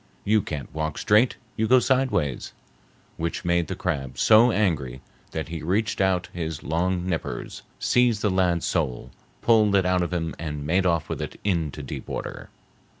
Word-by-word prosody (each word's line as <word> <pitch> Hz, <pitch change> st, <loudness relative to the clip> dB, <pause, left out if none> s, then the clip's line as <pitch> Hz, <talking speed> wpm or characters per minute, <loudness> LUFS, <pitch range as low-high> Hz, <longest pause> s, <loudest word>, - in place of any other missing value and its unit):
You 110 Hz, +1 st, +3 dB
can't 75 Hz, -7 st, -6 dB
walk 80 Hz, -1 st, -3 dB
straight; 110 Hz, +4 st, +3 dB, 0.2 s
you 110 Hz, 0 st, 0 dB
go 130 Hz, -, +6 dB
sidewise,' 125 Hz, -, 0 dB, 0.6 s
which 85 Hz, +2 st, -3 dB
made 85 Hz, -2 st, +1 dB
the -, -, -4 dB
crab 70 Hz, -2 st, -3 dB
so 115 Hz, +2 st, +6 dB
angry 80 Hz, -, 0 dB, 0.3 s
that 80 Hz, 0 st, -5 dB
he 80 Hz, -2 st, -5 dB
reached 105 Hz, +6 st, 0 dB
out 95 Hz, -2 st, +1 dB
his 80 Hz, -3 st, -4 dB
long 90 Hz, +3 st, 0 dB
nippers, 85 Hz, -3 st, -4 dB, 0.2 s
seized 120 Hz, -3 st, +2 dB
the 105 Hz, -, +2 dB
lad's 90 Hz, -3 st, +1 dB
soul, 70 Hz, -9 st, -2 dB, 0.3 s
pulled 110 Hz, -3 st, +4 dB
it 95 Hz, -2 st, +3 dB
out 90 Hz, 0 st, +2 dB
of 85 Hz, -, -2 dB
him 80 Hz, -3 st, -2 dB
and 75 Hz, -3 st, -4 dB
made 90 Hz, +4 st, +2 dB
off 85 Hz, -3 st, +1 dB
with -, -, -4 dB
it -, -, -6 dB
into 80 Hz, -7 st, -1 dB
deep 65 Hz, -, -7 dB
water. -, -, -6 dB
90 Hz, 170 wpm, -25 LUFS, 80-105 Hz, 0.6 s, go